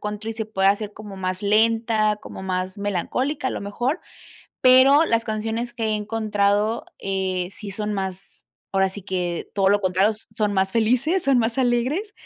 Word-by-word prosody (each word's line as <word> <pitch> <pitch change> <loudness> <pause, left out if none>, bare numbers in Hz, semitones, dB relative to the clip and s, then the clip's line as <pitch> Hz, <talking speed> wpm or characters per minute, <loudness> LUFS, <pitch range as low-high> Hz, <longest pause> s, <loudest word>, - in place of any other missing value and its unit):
country 210 +2 -4
se 220 -1 -4
pueda 195 -2 +3
hacer 205 0 -2
como 205 -2 -10
más 185 0 -3
lenta, 220 0 +2
como 200 - -10
más 185 +1 -3
melancólica, 255 - -2
lo - - -4
mejor, 240 - -2 0.6
pero 265 +4 +7
las 230 0 +1
canciones 225 +2 -3
que 230 -2 -4
he 215 -1 +1
encontrado, 210 0 0
eh, 190 -2 -2
sí 205 -2 -7
son 210 +1 -3
más 190 -1 -5 0.3
ahora 195 0 +2
sí 205 - -7
que 180 -3 -3
todo 195 -1 +3
lo 205 0 +3
contrario, 190 +3 +2 0.2
son 210 -1 -1
más 190 0 +1
felices, 250 - +2
son 270 -2 +3
más 230 +2 0
alegres, 260 - 0
210 Hz, 165 wpm, -23 LUFS, 195-230 Hz, 0.6 s, pero